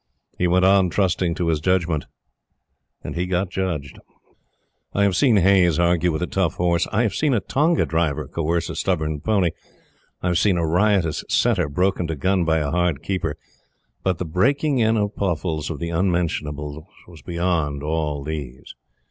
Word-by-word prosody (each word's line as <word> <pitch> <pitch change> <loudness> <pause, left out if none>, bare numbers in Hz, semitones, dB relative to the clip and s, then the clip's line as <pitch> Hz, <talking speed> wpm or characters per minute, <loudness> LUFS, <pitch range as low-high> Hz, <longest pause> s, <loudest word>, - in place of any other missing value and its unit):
He 90 - +2
went 90 +1 +3
on 95 -1 +4
trusting 90 -2 0
to 85 -2 -1
his 80 -2 +1
judgment, 85 -2 0 1.0
and - - -5
he 90 +1 -1
got 90 0 -1
judged. 85 -8 -3 0.9
I 100 - +2
have 100 -2 +2
seen 125 -7 +4
Hayes 90 -3 +4
argue 85 0 +2
with 80 +2 -2
a - - +1
tough 95 -3 -1
horse 85 -1 +1
I 110 +4 +2
have 110 - 0
seen 150 -4 +1
a - - +2
tonga 155 - +1
driver 80 -1 -1
coerce 85 +1 -1
a - - -7
stubborn 80 -5 -1
pony 100 -6 +1 0.7
I 90 - +1
have 85 - +2
seen 100 -4 +2
a 85 - 0
riotous 90 -1 +1
setter - - +2
broken 90 +3 0
to 80 - -3
gun 90 +5 +1
by 80 0 +2
a 75 -2 -1
hard 85 -4 0
keeper 85 -6 -2 0.6
but 95 -3 0
the 90 - -3
breaking 135 - +1
in 110 0 +3
of 105 0 -1
Pluffles 80 -4 -2
of 80 - -4
the 85 +4 -4
"Unmentionables" 80 -4 -2 0.2
was 85 -3 -14
beyond 85 -5 -1
all 75 -2 -2
these. 70 -4 -6
85 Hz, 175 wpm, -22 LUFS, 80-95 Hz, 1.0 s, on